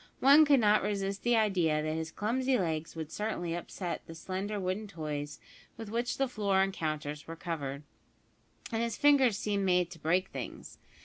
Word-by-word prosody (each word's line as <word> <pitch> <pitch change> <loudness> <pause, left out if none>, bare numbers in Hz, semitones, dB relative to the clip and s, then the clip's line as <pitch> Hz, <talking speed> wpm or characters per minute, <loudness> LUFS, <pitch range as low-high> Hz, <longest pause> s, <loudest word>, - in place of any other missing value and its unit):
One 285 +4 +7
could 285 -2 +5
not 210 -1 +4
resist 200 -1 -2
the 240 0 +3
idea 180 -8 +2
that 155 0 -1
his 160 0 -3
clumsy 250 +8 0
legs 165 -5 -2
would 160 -1 -6
certainly 190 -6 -2
upset 175 0 -4
the 165 - -9
slender 195 +5 -4
wooden 190 +3 -2
toys 150 -5 -5 0.4
with 225 -2 -7
which 240 +2 -1
the 270 - +1
floor 200 -5 +2
and 195 0 -2
counters 150 -3 -4
were 165 - -6
covered, 145 -4 -4 0.9
and 225 0 0
his 235 -1 -2
fingers 275 -7 +5
seemed 205 -2 -1
made 180 -2 +2
to 165 - -10
break 175 +5 +1
things. - - -8
190 Hz, 180 wpm, -31 LUFS, 160-220 Hz, 0.9 s, One